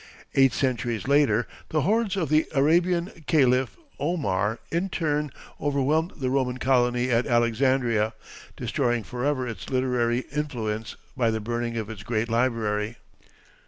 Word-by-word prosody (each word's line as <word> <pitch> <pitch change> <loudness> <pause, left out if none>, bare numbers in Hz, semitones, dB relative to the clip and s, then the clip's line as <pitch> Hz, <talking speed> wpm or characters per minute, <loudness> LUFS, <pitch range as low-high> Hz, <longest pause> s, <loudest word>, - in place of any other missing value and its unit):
Eight 135 -1 +5
centuries 120 -3 -1
later 140 -5 +3 0.2
the 155 - +1
hordes 210 +3 +1
of 165 -7 -1
the 155 +1 +3
Arabian 170 +5 +2
Caliph 130 -4 +3 0.2
Omar 115 - 0
in 175 +4 0
turn 150 -4 -1 0.3
overwhelmed 150 +5 +1
the 130 -4 -2
Roman 130 -2 0
colony 125 -1 +2
at 120 +1 +2
Alexandria, 120 -2 +2 0.4
destroying 120 -2 0
forever 130 +2 -1
its 110 -6 -7
literary 125 -2 +1
influence 115 -7 -3 0.2
by 120 -3 +2
the 110 0 -1
burning 120 +1 -3
of 110 -2 -3
its 110 -2 -8
great 115 +1 -1
library. 115 -2 0
125 Hz, 130 wpm, -26 LUFS, 115-145 Hz, 0.4 s, Eight